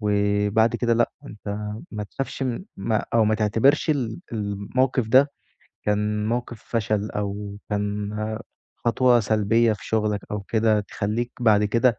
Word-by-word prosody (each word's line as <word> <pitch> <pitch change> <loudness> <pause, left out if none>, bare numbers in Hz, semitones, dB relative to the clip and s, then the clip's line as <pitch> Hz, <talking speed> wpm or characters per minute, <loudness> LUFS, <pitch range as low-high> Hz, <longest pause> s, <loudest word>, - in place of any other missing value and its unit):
وبَعد 105 +2 +2
كده 120 -1 +2
لأ، 120 0 +2 0.2
أنت 105 -1 -10 0.4
ما 105 -1 -3
تخافش 135 +5 -5
من 130 +6 -2
ما 110 +2 0
أو 115 -2 +5
ما 110 +1 +3
تعتبرش 115 +9 +3
ال 130 -2 -1
الموقِف 110 +4 0
ده 135 +4 +6 0.5
كان 105 0 0
موقِف 120 -1 -3
فشل 105 -2 -1
أو 100 0 -4
كان 105 0 -1 0.7
خطوة 120 0 +3
سلبية 110 +2 +3
في 105 - -7
شُغلك 105 -2 0
أو 105 - -2
كده 110 +1 +2
تخلّيك 110 +4 -3
بَعد 105 -3 +4
كده 115 +2 +2
110 Hz, 140 wpm, -24 LUFS, 105-120 Hz, 0.7 s, ده